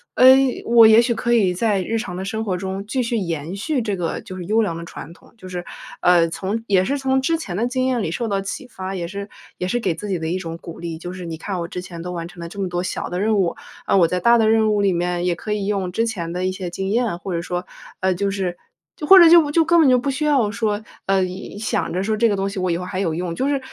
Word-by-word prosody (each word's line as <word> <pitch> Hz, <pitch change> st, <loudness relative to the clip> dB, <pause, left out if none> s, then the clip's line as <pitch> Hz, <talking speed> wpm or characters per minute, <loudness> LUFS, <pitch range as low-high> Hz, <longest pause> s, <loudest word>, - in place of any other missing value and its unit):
呃， 255 Hz, -, +5 dB, 0.4 s
我 230 Hz, -1 st, +7 dB
也 220 Hz, +1 st, +8 dB
许 235 Hz, 0 st, 0 dB
可 235 Hz, -, -1 dB
以 205 Hz, -6 st, +3 dB
在 200 Hz, +1 st, +1 dB
日 225 Hz, +5 st, -2 dB
常 205 Hz, -6 st, -4 dB
的 190 Hz, -, -4 dB
生 220 Hz, +3 st, -3 dB
活 190 Hz, -4 st, -2 dB
中 190 Hz, +1 st, -5 dB
继 255 Hz, +5 st, -1 dB
续 235 Hz, 0 st, -1 dB
延 170 Hz, -4 st, -3 dB
续 260 Hz, +7 st, -1 dB
这 210 Hz, -3 st, -2 dB
个， 175 Hz, -3 st, -3 dB
就 185 Hz, -, -9 dB
是 185 Hz, -, -6 dB
优 215 Hz, +6 st, +2 dB
良 195 Hz, -7 st, -1 dB
的 170 Hz, -, -7 dB
传 165 Hz, -2 st, -9 dB
统。 -, -, -21 dB
就 185 Hz, -, -11 dB
是， 180 Hz, -1 st, -5 dB, 0.4 s
呃， 175 Hz, -2 st, +5 dB
从 195 Hz, +6 st, -3 dB
也 190 Hz, -2 st, +3 dB
是 280 Hz, +9 st, -1 dB
从 265 Hz, -1 st, +1 dB
之 330 Hz, +5 st, +1 dB
前 200 Hz, -, -6 dB
的 220 Hz, +5 st, 0 dB
经 255 Hz, +1 st, -1 dB
验 250 Hz, -4 st, 0 dB
里 160 Hz, -, -2 dB
受 235 Hz, +6 st, -2 dB
到 200 Hz, -2 st, -1 dB
启 220 Hz, +7 st, -6 dB
发， 190 Hz, -5 st, -6 dB
也 175 Hz, -3 st, -3 dB
是 200 Hz, +3 st, -6 dB, 0.3 s
也 180 Hz, -, -3 dB
是 240 Hz, -, 0 dB
给 185 Hz, -8 st, -1 dB
自 205 Hz, +6 st, -7 dB
己 185 Hz, -3 st, -1 dB
的 160 Hz, -, -3 dB
一 175 Hz, +3 st, -1 dB
种 165 Hz, -3 st, -6 dB
鼓 170 Hz, -1 st, -10 dB
励。 165 Hz, -1 st, -5 dB
就 175 Hz, +2 st, -7 dB
是 185 Hz, -1 st, -7 dB
你 165 Hz, -1 st, -5 dB
看 190 Hz, +4 st, -4 dB
我 170 Hz, -, -4 dB
之 180 Hz, -, -6 dB
前 175 Hz, -2 st, -9 dB
都 180 Hz, +1 st, -5 dB
完 170 Hz, -1 st, -5 dB
成 175 Hz, 0 st, -12 dB
了 170 Hz, -, -6 dB
这 200 Hz, -, -10 dB
么 195 Hz, -, -1 dB
多 175 Hz, 0 st, -2 dB
小 -, -, -4 dB
的 180 Hz, +1 st, -3 dB
任 215 Hz, 0 st, +2 dB
务， 180 Hz, -4 st, +1 dB, 0.3 s
嗯， -, -, +3 dB
我 175 Hz, -, +6 dB
在 180 Hz, +2 st, -1 dB
大 235 Hz, +6 st, +5 dB
的 220 Hz, -1 st, +3 dB
任 220 Hz, -1 st, +3 dB
务 205 Hz, -, +1 dB
里 200 Hz, -1 st, +3 dB
面 175 Hz, 0 st, -1 dB
也 180 Hz, -, +2 dB
可 210 Hz, +5 st, -4 dB
以 205 Hz, -2 st, -2 dB
用 195 Hz, -3 st, -1 dB
之 225 Hz, +4 st, +1 dB
前 175 Hz, -7 st, -4 dB
的 180 Hz, +1 st, -2 dB
一 185 Hz, -, 0 dB
些 185 Hz, -1 st, -5 dB
经 190 Hz, +2 st, -4 dB
验， 230 Hz, -4 st, 0 dB
或 185 Hz, +1 st, -6 dB
者 170 Hz, -, -1 dB
说， 180 Hz, +1 st, -4 dB, 0.4 s
呃， 190 Hz, 0 st, +2 dB
就 200 Hz, +2 st, -1 dB
是 185 Hz, -3 st, -3 dB, 0.4 s
就 300 Hz, -, -5 dB
或 385 Hz, -, +10 dB
者 345 Hz, -2 st, +9 dB
就 330 Hz, -3 st, +7 dB
就 330 Hz, +2 st, +4 dB
根 340 Hz, +1 st, +4 dB
本 305 Hz, -4 st, +6 dB
就 255 Hz, -, +5 dB
不 275 Hz, +3 st, -1 dB
需 300 Hz, +3 st, -2 dB
要 265 Hz, -8 st, +2 dB
说， 210 Hz, 0 st, -1 dB, 0.2 s
呃， 195 Hz, -1 st, +3 dB
一 185 Hz, +2 st, -6 dB
想 215 Hz, -, -2 dB
着 185 Hz, +2 st, -1 dB
说 215 Hz, +2 st, 0 dB
这 230 Hz, +1 st, +3 dB
个 205 Hz, -, +1 dB
东 195 Hz, 0 st, -1 dB
西 195 Hz, 0 st, -5 dB
我 185 Hz, 0 st, 0 dB
以 170 Hz, -, +1 dB
后 180 Hz, -, -5 dB
还 185 Hz, 0 st, -4 dB
有 175 Hz, -5 st, 0 dB
用， 175 Hz, 0 st, -3 dB
就 260 Hz, +10 st, -1 dB
是 285 Hz, -1 st, +1 dB
195 Hz, 325 characters per minute, -21 LUFS, 180-225 Hz, 0.4 s, 或